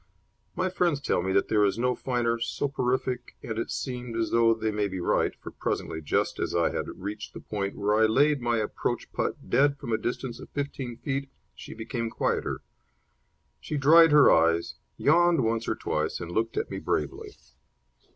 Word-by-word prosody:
My 185 - 0
friends 175 -5 +1
tell 140 - 0
me 95 +2 -1
that 100 - +2
there 105 -1 +3
is 100 +1 +2
no 125 +1 +1
finer 120 -2 -1
soporific, 125 0 -2
and 110 -1 -4
it - - -3
seemed 125 -3 -4
as 115 - -1
though 115 -1 +4
they 110 0 -1
may 105 -1 0
be 95 -1 -5
right, 85 - +1
for - - -10
presently, 80 - -3
just 75 - 0
as - - -2
I - - +2
had - - -3
reached 105 +3 -6
the - - -6
point 100 -2 -4
where 105 +1 +1
I 110 +1 +5
laid 145 +5 +3
my 120 -1 +1
approach 110 -1 -3
putt - - -3
dead 140 +3 +4
from 125 -5 -4
a 110 - +1
distance 120 0 -4
of - - -11
fifteen 135 -4 -4
feet, 140 0 -3 0.2
she - - -10
became 115 +1 -3
quieter. - - -1 1.0
She 150 - -4
dried 160 +4 +7
her 150 -1 +7
eyes, 85 +1 +3 0.2
yawned 170 -1 +4
once 115 0 -1
or - - 0
twice, - - -2
and 85 - -6
looked 115 +4 -1
at - - -2
me - - -3
bravely. 75 -3 -3
115 Hz, 190 wpm, -27 LUFS, 110-135 Hz, 1.0 s, dried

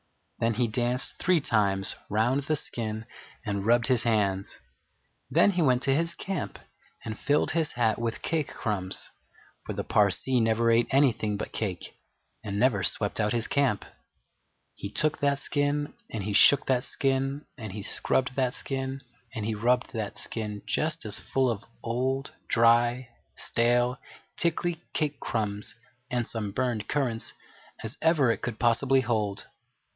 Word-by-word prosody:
Then 115 -1 +1
he 120 +1 +2
danced 120 +3 0
three 180 -2 +3
times 100 -7 +2
round 115 +6 +2
the 155 +2 0
skin 110 -5 -4 0.4
and 100 -1 -2
rubbed 120 0 +4
his 130 -3 +4
hands. 100 -4 0 0.7
Then 205 - +5
he 180 -2 0
went 130 -4 +3
to 135 - +3
his 165 +4 0
camp 190 -5 -4 0.5
and 110 -1 -5
filled 145 +1 +2
his 160 -2 0
hat 115 -3 +1
with 115 -1 -3
cake 160 -4 0
crumbs, 95 -4 -3 0.5
for - - -5
the - - -3
Parsee 105 +5 +3
never 115 +1 +3
ate 115 +1 +3
anything 120 -7 +2
but - - -5
cake, 95 -5 -4 0.5
and 100 -2 -3
never 110 -3 +3
swept 100 +5 0
out 105 -1 +1
his 115 -1 0
camp. 135 -7 +1 0.9
He 100 - -6
took 155 +8 0
that 140 -1 +2
skin, 145 0 -1 0.2
and 110 -3 -4
he 105 +1 -2
shook 140 +6 +6
that 125 -2 +1
skin, 135 +1 -1
and 110 -7 -7
he 100 +1 -6
scrubbed 130 +4 0
that 130 -2 0
skin, 135 0 -4 0.3
and 110 - -3
he 110 - -1
rubbed 125 +5 +1
that 110 -3 -4
skin 105 -2 -5
just 160 -2 -1
as 105 - -1
full 130 -2 +1
of 105 -2 -5 0.2
old, 130 +4 -1 0.2
dry, 120 +2 +3 0.3
stale, 120 +1 +1 0.4
tickly 170 0 0
cake 150 -2 -1
crumbs 105 -2 -2 0.3
and 120 -1 0
some 110 -3 -4
burned 120 -1 -1
currants 125 -6 -1 0.5
as - - -4
ever 155 -6 +4
it - - -3
could 120 -5 -4
possibly 130 +3 +3
hold. 110 -5 -1
120 Hz, 155 wpm, -28 LUFS, 110-135 Hz, 0.9 s, shook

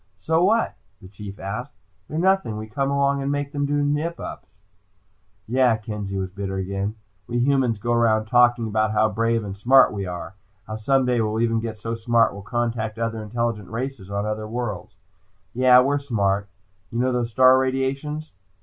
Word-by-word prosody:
"So 160 - +1
what?" 225 +5 +2 0.2
the 95 - -13
Chief 100 +1 -9
asked. 95 +1 -5 0.3
"They're 155 - -5
nothing. 185 - +2
We 110 - -5
come 135 +6 -2
along 140 0 +1
and 135 +1 -1
make 145 0 -2
them 145 -1 -1
do 145 0 +1
nip 150 +4 -1
ups." - - -7 1.0
"Yeah," 125 -1 +3
Kenzie 105 -2 -5
was 95 -1 -3
bitter 95 0 -4
again. 100 +2 -3 0.3
"We 120 - -2
humans 125 -2 +2
go 120 +4 -1
around 110 -2 +3
talking 120 0 +4
about 110 0 0
how 110 0 +3
brave 115 +1 0
and 100 -2 -6
smart 130 +6 +5
we 100 -2 -4
are. 90 +1 -6 0.3
How 110 - -5
someday 125 +1 +2
we 110 -1 0
might 110 +2 0
even 115 -1 +1
get 110 -1 -5
so 115 +2 -4
smart 115 0 +2
we'll 100 - -8
contact 115 0 -2
other 115 -1 -2
intelligent 110 -2 -3
races 115 -3 -5
on 100 +1 -2
other 105 0 -3
worlds. 110 -4 -5 0.6
Yeah, 125 0 +6
we're 140 +2 +1
smart. 100 -7 0 0.4
You 115 - -4
know 130 +1 +2
those 120 -2 -1
star 130 +2 +6
radiations?" 135 +4 -2
115 Hz, 185 wpm, -23 LUFS, 105-130 Hz, 1.0 s, Yeah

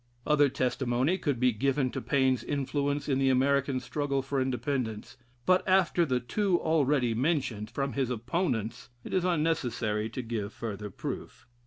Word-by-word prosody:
Other 145 -2 +4
testimony 130 +5 0
could 145 -7 -1
be 125 0 +4
given 130 +3 0
to - - -4
Paine's 130 -4 +2
influence 145 0 -1
in 135 -2 +1
the 135 -1 +3
American 135 +1 +2
struggle 140 +2 -2
for 135 0 -1
Independence; 125 -3 -2 0.3
but 185 0 +4
after 180 -3 +3
the 125 -2 +1
two 185 - +1
already 145 -6 +2
mentioned 125 -5 -1
from 135 +3 -2
his 135 -3 0
opponents, 120 - -2
it - - -7
is 185 - +2
unnecessary 120 -11 0
to 125 +3 -5
give 110 -3 -4
further 105 -2 -5
proof. - - -7
135 Hz, 155 wpm, -29 LUFS, 120-145 Hz, 0.3 s, Other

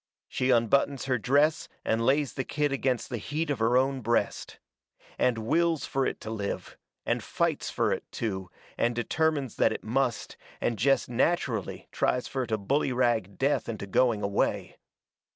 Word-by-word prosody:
She 130 - -1
unbuttons 130 +3 +2
her 130 -3 +1
dress 145 +7 +2 0.2
and 115 +1 +1
lays 135 0 +2
the 130 - -2
kid 145 +2 -1
against 130 -2 -1
the 120 - -2
heat 150 +7 -2
of 135 - -2
her 115 +2 +3
own 135 0 +1
breast. 120 +1 -1 0.6
And 125 -2 +2
wills 160 +7 +1
fur 135 -1 0
it - - -4
to 110 - -6
live, 105 -3 -4 0.3
and - - 0
fights - - -1
fur - - 0
it - - -4
to, 95 -5 -3 0.3
and 120 0 +2
determines 145 +2 0
that - - +4
it - - -5
must, 125 +1 -1 0.2
and 115 -3 -1
jest 135 +5 +3
natcherally 120 - 0
tries 125 - 0
fur 130 -2 -2
to 110 -1 0
bullyrag 120 -3 0
death 140 -1 +1
into 110 -3 -4
going 110 +2 +2
away. 100 0 -1
125 Hz, 165 wpm, -28 LUFS, 115-140 Hz, 0.6 s, that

